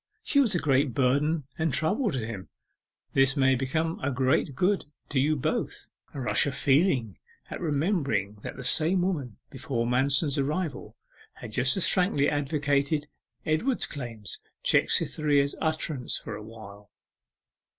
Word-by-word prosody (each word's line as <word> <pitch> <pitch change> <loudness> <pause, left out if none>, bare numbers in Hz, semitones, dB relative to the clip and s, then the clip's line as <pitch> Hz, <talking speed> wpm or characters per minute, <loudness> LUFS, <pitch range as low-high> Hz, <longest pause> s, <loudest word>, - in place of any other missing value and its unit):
She 285 - +2
was 240 -9 +3
a - - +2
great 135 -4 +1
burden 145 +4 +2 0.2
and 160 -1 +1
trouble 205 - +1
to 130 - -2
him. 105 -5 -7 0.6
This 135 +2 +3
may 135 -1 +4
become 155 +6 -1
a 140 - -1
great 130 +1 +1
good 190 +7 +1 0.2
to 140 - +1
you 150 +4 +2
both.' 140 - -3 0.3
A - - -4
rush 130 +3 +2
of 135 - -3
feeling 135 - +2 0.3
at - - -5
remembering 145 - 0
that - - -7
the 125 - -7
same 170 +7 +3
woman, 140 - -2
before 130 -3 -2
Manston's 135 +4 +2
arrival, 150 +1 -3 0.4
had 115 - -10
just 130 - +2
as 190 - +2
frankly 180 -7 +2
advocated 145 0 0 0.4
Edward's 195 - +1
claims, 115 -8 -5 0.2
checked - - +3
Cytherea's 145 -2 +1
utterance 155 -4 -1
for 110 - -7
awhile. 105 -2 -11
140 Hz, 145 wpm, -27 LUFS, 125-160 Hz, 0.6 s, may